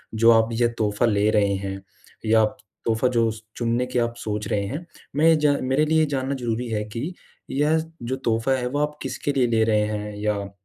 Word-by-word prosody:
जो 115 Hz, +1 st, +6 dB
आप 115 Hz, 0 st, +4 dB
ये 120 Hz, +1 st, +3 dB
तोहफ़ा 105 Hz, 0 st, +1 dB
ले 105 Hz, -1 st, +2 dB
रहे 100 Hz, -1 st, +3 dB
हैं, 95 Hz, 0 st, -5 dB, 0.4 s
या 110 Hz, 0 st, +5 dB
आप 110 Hz, -, 0 dB, 0.3 s
तोहफ़ा 115 Hz, +2 st, +2 dB
जो 115 Hz, -2 st, +2 dB
स 110 Hz, 0 st, -9 dB, 0.2 s
चुनने 120 Hz, +1 st, 0 dB
की 125 Hz, -1 st, -1 dB
आप 115 Hz, 0 st, 0 dB
सोच 105 Hz, -1 st, -3 dB
रहे 100 Hz, -1 st, 0 dB
हैं, 155 Hz, -, -5 dB, 0.3 s
मैं 155 Hz, +2 st, +3 dB
ये 165 Hz, -, +7 dB
जा 150 Hz, -1 st, +3 dB
मेरे 135 Hz, +4 st, +2 dB
लिए 160 Hz, 0 st, +3 dB
जानना 135 Hz, -1 st, -2 dB
ज़रूरी 120 Hz, -1 st, -2 dB
है 105 Hz, -1 st, -1 dB
कि 145 Hz, +10 st, -3 dB, 0.4 s
यह 150 Hz, +3 st, +2 dB, 0.3 s
जो 130 Hz, +3 st, -2 dB
तोहफ़ा 115 Hz, 0 st, 0 dB
है, 125 Hz, -1 st, -2 dB
वो 145 Hz, +3 st, -2 dB
आप 150 Hz, 0 st, -1 dB
किसके 135 Hz, +2 st, -2 dB
लिए 125 Hz, -3 st, +2 dB
ले 115 Hz, -1 st, +2 dB
रहे 110 Hz, -1 st, +3 dB
हैं? 105 Hz, 0 st, -4 dB
या 105 Hz, -1 st, -1 dB
115 Hz, 220 wpm, -24 LUFS, 105-135 Hz, 0.4 s, ये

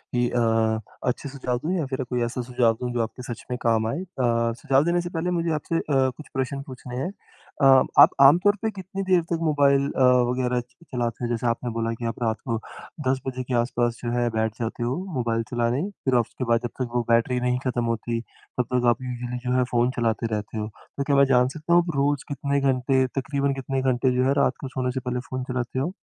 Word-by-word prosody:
ही 120 Hz, 0 st, +2 dB
अ, 115 Hz, -2 st, +2 dB, 0.3 s
अच्छे 135 Hz, +3 st, -1 dB
सुझाव 130 Hz, -3 st, -2 dB
दूँ, 175 Hz, +4 st, 0 dB
या 160 Hz, -, -1 dB
फिर 130 Hz, 0 st, -3 dB
कोई 125 Hz, -1 st, -2 dB
ऐसा 125 Hz, +2 st, -3 dB
सुझाव 120 Hz, -2 st, +2 dB
दूँ, 125 Hz, -, -2 dB
जो 120 Hz, -, 0 dB
आपके 115 Hz, +3 st, -5 dB
सच 115 Hz, -, -12 dB
में 125 Hz, -, -1 dB
काम 110 Hz, -1 st, +2 dB
आए। 115 Hz, -, -2 dB
अ, 120 Hz, -9 st, 0 dB
सुझाव 135 Hz, +1 st, +3 dB
देने 175 Hz, +1 st, +2 dB
से 175 Hz, -, -5 dB
पहले 175 Hz, +1 st, -2 dB
मुझे 170 Hz, -1 st, 0 dB
आपसे 155 Hz, +2 st, -2 dB
अ, -, -, 0 dB
कुछ 135 Hz, +1 st, +1 dB
प्रश्न 135 Hz, +1 st, -2 dB
पूछने 125 Hz, -1 st, -8 dB
हैं। 135 Hz, +9 st, -2 dB, 0.5 s
अ, 135 Hz, -, +5 dB, 0.4 s
आप -, -, +10 dB
आमतौर 180 Hz, +9 st, +6 dB
पे 220 Hz, -, 0 dB
कितनी 195 Hz, 0 st, -6 dB
देर 185 Hz, -2 st, +3 dB
तक 165 Hz, -, +1 dB
मोबाइल 140 Hz, -3 st, +3 dB
अ, -, -, -2 dB, 0.3 s
वग़ैरह 125 Hz, -1 st, 0 dB
च 120 Hz, -, -7 dB, 0.3 s
चलाते 120 Hz, -1 st, -2 dB
हैं। 120 Hz, -, -1 dB
जैसे 120 Hz, +1 st, -1 dB
आपने 120 Hz, +1 st, -1 dB
बोला 115 Hz, 0 st, -1 dB
कि 115 Hz, +1 st, -6 dB
आप 115 Hz, +1 st, -4 dB
रात 110 Hz, -1 st, 0 dB
को 115 Hz, -, +1 dB, 0.5 s
10 130 Hz, 0 st, +2 dB
बजे 130 Hz, -1 st, -3 dB
के 125 Hz, -, -5 dB
आसपास 120 Hz, -1 st, -1 dB
जो 120 Hz, -, -1 dB
है 120 Hz, 0 st, +1 dB
बैठ 110 Hz, 0 st, +1 dB
जाते 115 Hz, +1 st, -3 dB
हो 120 Hz, +2 st, 0 dB, 0.2 s
मोबाइल 115 Hz, -3 st, 0 dB
चलाने, 120 Hz, +3 st, +1 dB, 0.2 s
फिर 130 Hz, -2 st, +2 dB
आप 120 Hz, -, +5 dB
उसके 130 Hz, -, -6 dB
बाद 115 Hz, 0 st, +3 dB
जब 120 Hz, -, -2 dB
तक 125 Hz, -, -1 dB
वो 120 Hz, -, +3 dB
बैटरी 115 Hz, +2 st, +3 dB
नहीं 125 Hz, 0 st, 0 dB
ख़त्म 120 Hz, -1 st, 0 dB
होती, 115 Hz, 0 st, -1 dB
तब 125 Hz, -, -6 dB
तक 125 Hz, -1 st, +2 dB
आप 120 Hz, +2 st, +1 dB
यूजुअली 125 Hz, -1 st, -4 dB
जो 125 Hz, -, +1 dB
है 125 Hz, -, +4 dB
फ़ोन 120 Hz, +1 st, +2 dB
चलाते 115 Hz, -1 st, 0 dB
रहते 105 Hz, +1 st, -5 dB
हो। 105 Hz, -, -2 dB, 0.3 s
तो 140 Hz, -, 0 dB
क्या 140 Hz, 0 st, +1 dB
मैं 140 Hz, -, +6 dB
जान 125 Hz, 0 st, +5 dB
सकता 155 Hz, +5 st, -2 dB
हूँ, 175 Hz, -, +7 dB
आप 170 Hz, -, -3 dB
रोज़ 140 Hz, 0 st, +1 dB
कितने 140 Hz, 0 st, -1 dB
घंटे 130 Hz, 0 st, +2 dB
तक़रीबन 140 Hz, +1 st, -1 dB
कितने 135 Hz, 0 st, -2 dB
घंटे 130 Hz, 0 st, +2 dB
जो 125 Hz, -, +2 dB
है, 135 Hz, -, +3 dB
रात 135 Hz, -2 st, +3 dB
को 135 Hz, -, -4 dB
सोने 130 Hz, -1 st, -2 dB
से 130 Hz, -, -3 dB
पहले 125 Hz, -, -1 dB
फ़ोन 130 Hz, 0 st, -3 dB
चलाते 125 Hz, 0 st, -3 dB
हो? 170 Hz, +8 st, -2 dB
125 Hz, 240 wpm, -25 LUFS, 120-140 Hz, 0.5 s, आप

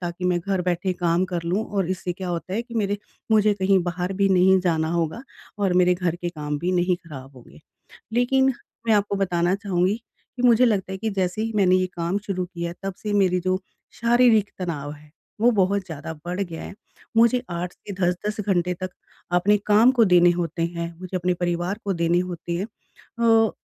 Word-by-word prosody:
ताकि 175 Hz, 0 st, -5 dB
मैं 180 Hz, -1 st, +2 dB
घर 190 Hz, +1 st, -1 dB
बैठे 180 Hz, +1 st, 0 dB
काम 175 Hz, 0 st, +1 dB
कर 170 Hz, -1 st, -1 dB
लूँ 185 Hz, +6 st, 0 dB
और 190 Hz, -2 st, 0 dB
इससे 185 Hz, -1 st, -2 dB
क्या 185 Hz, 0 st, -6 dB
होता 175 Hz, +2 st, -3 dB
है 225 Hz, -, -1 dB
कि 235 Hz, 0 st, -12 dB
मेरे 205 Hz, -2 st, 0 dB, 0.3 s
मुझे 215 Hz, -1 st, +4 dB
कहीं 195 Hz, 0 st, +3 dB
बाहर 180 Hz, +1 st, -3 dB
भी 195 Hz, +1 st, +2 dB
नहीं 190 Hz, 0 st, +5 dB
जाना 160 Hz, -3 st, 0 dB
होगा 170 Hz, +7 st, -1 dB, 0.4 s
और 195 Hz, -3 st, +1 dB
मेरे 180 Hz, 0 st, +4 dB
घर 175 Hz, -2 st, -1 dB
के 175 Hz, 0 st, -4 dB
काम 150 Hz, -3 st, -4 dB
भी 180 Hz, +4 st, -1 dB
नहीं 180 Hz, 0 st, +2 dB
खराब 140 Hz, -6 st, -11 dB
होंगे। 125 Hz, +5 st, -16 dB, 0.5 s
लेकिन 265 Hz, +2 st, +3 dB, 0.3 s
मैं 225 Hz, -, +5 dB
आपको 205 Hz, 0 st, +1 dB
बताना 180 Hz, -2 st, +1 dB
चाहूँगी 195 Hz, -1 st, 0 dB, 0.4 s
कि 250 Hz, -, -5 dB
मुझे 245 Hz, 0 st, +6 dB
लगता 200 Hz, -5 st, 0 dB
है 190 Hz, -, -4 dB
कि 220 Hz, +3 st, -2 dB
जैसे 190 Hz, 0 st, -1 dB
ही 225 Hz, 0 st, -2 dB
मैंने 185 Hz, -3 st, +4 dB
ये 185 Hz, 0 st, +2 dB
काम 170 Hz, +3 st, 0 dB
शुरू 185 Hz, -2 st, -2 dB
किया, 170 Hz, -1 st, -5 dB
तब 195 Hz, 0 st, -3 dB
से 210 Hz, -1 st, -4 dB
मेरी 185 Hz, -3 st, +3 dB
जो 185 Hz, +1 st, 0 dB, 0.4 s
शारीरिक 235 Hz, -3 st, +4 dB
तनाव 150 Hz, -6 st, -4 dB
है 150 Hz, 0 st, -17 dB, 0.3 s
वो 240 Hz, -, +6 dB
बहुत 200 Hz, -2 st, +1 dB
ज़्यादा 160 Hz, -2 st, -7 dB
बढ़ 180 Hz, +2 st, -3 dB
गया 170 Hz, -4 st, -5 dB
है। -, -, -8 dB, 0.4 s
मुझे 235 Hz, +2 st, +5 dB
8 175 Hz, 0 st, -3 dB
से 200 Hz, -, -6 dB
10-10 185 Hz, +3 st, -1 dB
घंटे 180 Hz, -3 st, 0 dB
तक 185 Hz, +1 st, -5 dB, 0.4 s
अपने 195 Hz, +4 st, +4 dB
काम 215 Hz, +4 st, +6 dB
को 245 Hz, -3 st, +4 dB
देने 175 Hz, -2 st, +6 dB
होते 175 Hz, -1 st, -3 dB
हैं, 170 Hz, 0 st, -5 dB
मुझे 185 Hz, 0 st, -4 dB
अपने 180 Hz, 0 st, 0 dB
परिवार 175 Hz, +2 st, -2 dB
को 200 Hz, -, 0 dB
देने 170 Hz, 0 st, +2 dB
होते 175 Hz, -1 st, -5 dB
हैं। 190 Hz, -, -2 dB, 0.8 s
अ, -, -, -9 dB
185 Hz, 205 wpm, -23 LUFS, 175-200 Hz, 0.8 s, मुझे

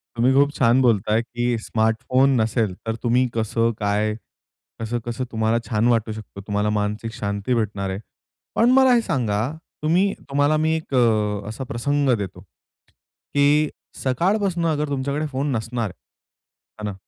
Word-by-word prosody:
तुम्ही 125 Hz, +3 st, +3 dB
खूप 140 Hz, +1 st, +4 dB
छान 125 Hz, +1 st, +3 dB
बोलताय 110 Hz, -2 st, +3 dB
की 120 Hz, +1 st, -3 dB
स्मार्टफोन 120 Hz, +5 st, +2 dB
नसेल 110 Hz, -2 st, 0 dB
तर 115 Hz, 0 st, -1 dB
तुम्ही 125 Hz, +2 st, +3 dB
कसं 115 Hz, +1 st, +1 dB
काय? 105 Hz, +1 st, 0 dB, 0.7 s
कसं-कसं 120 Hz, +2 st, -3 dB
तुम्हाला 110 Hz, +1 st, +1 dB
छान 110 Hz, +1 st, +1 dB
वाटू 115 Hz, -2 st, +1 dB
शकतं, 105 Hz, -2 st, -9 dB
तुम्हाला 105 Hz, 0 st, 0 dB
मानसिक 105 Hz, +2 st, -2 dB
शांती 100 Hz, +3 st, -2 dB
भेटणार 100 Hz, -3 st, -1 dB
आहे. 95 Hz, +1 st, -3 dB, 0.6 s
पण 240 Hz, +2 st, +4 dB
मला 265 Hz, 0 st, +6 dB
हे 235 Hz, -, +4 dB
सांगा 110 Hz, -, 0 dB, 0.4 s
तुम्ही 180 Hz, +6 st, +3 dB, 0.2 s
तुम्हाला 145 Hz, +2 st, +2 dB
मी 160 Hz, +1 st, +1 dB
एक 160 Hz, -3 st, -6 dB
अ, 105 Hz, -4 st, +2 dB
असा 120 Hz, +5 st, -5 dB
प्रसंग 140 Hz, +2 st, 0 dB
देतो 95 Hz, -3 st, -6 dB, 0.9 s
की 145 Hz, +1 st, +4 dB, 0.3 s
सकाळपासून 175 Hz, -, +1 dB, 0.2 s
तुमच्याकडे 140 Hz, +2 st, -1 dB
फोन 140 Hz, +1 st, -2 dB
नसणार. 115 Hz, -2 st, -2 dB, 0.9 s
हां 105 Hz, -, -6 dB
ना? 105 Hz, -, -3 dB
120 Hz, 140 wpm, -22 LUFS, 110-140 Hz, 0.9 s, मला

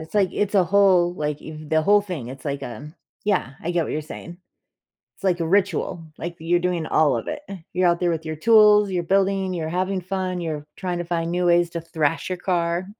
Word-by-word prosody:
it's, 160 Hz, +4 st, -11 dB
like, 195 Hz, -4 st, +3 dB
it's 205 Hz, 0 st, -1 dB
a 190 Hz, -3 st, +5 dB
whole, 185 Hz, -2 st, +4 dB
like, 150 Hz, -2 st, -3 dB
eve 155 Hz, -1 st, -9 dB
the 160 Hz, 0 st, +2 dB
whole 205 Hz, +5 st, +5 dB
thing, 180 Hz, -, -6 dB
it's 130 Hz, +1 st, -10 dB
like 140 Hz, -1 st, -3 dB
a 125 Hz, +6 st, -7 dB, 0.3 s
yeah, 195 Hz, -, +1 dB
I 170 Hz, -, -2 dB
get 175 Hz, -2 st, +1 dB
what -, -, -4 dB
you're 155 Hz, -, -1 dB
saying. 170 Hz, +2 st, -9 dB, 0.8 s
It's -, -, -18 dB
like 180 Hz, -2 st, +1 dB
a 165 Hz, -, 0 dB
ritual, 185 Hz, -3 st, 0 dB
like, 170 Hz, +1 st, -5 dB
th 160 Hz, -, -11 dB
you're 175 Hz, -, +5 dB
doing 175 Hz, -2 st, -1 dB
all 155 Hz, -5 st, +3 dB
of 115 Hz, -, -5 dB
it. -, -, -4 dB, 0.3 s
You're 180 Hz, 0 st, +3 dB
out 170 Hz, 0 st, +1 dB
there 175 Hz, -1 st, +2 dB
with 160 Hz, -1 st, -3 dB
your 155 Hz, 0 st, -4 dB
tools, 210 Hz, +1 st, +6 dB
you're 180 Hz, -2 st, -1 dB
building, 195 Hz, +1 st, +1 dB
you're 160 Hz, -2 st, -3 dB
having 185 Hz, +2 st, -1 dB
fun, 185 Hz, 0 st, -3 dB
you're 150 Hz, -3 st, -4 dB
trying 180 Hz, -2 st, -3 dB
to 175 Hz, -, -3 dB
find 170 Hz, -1 st, -2 dB
new 180 Hz, 0 st, 0 dB
ways 175 Hz, 0 st, +3 dB
to 170 Hz, 0 st, -4 dB
thrash 160 Hz, -1 st, -1 dB
your 185 Hz, -, -2 dB
car. 175 Hz, 0 st, -1 dB
175 Hz, 235 wpm, -23 LUFS, 160-185 Hz, 0.8 s, tools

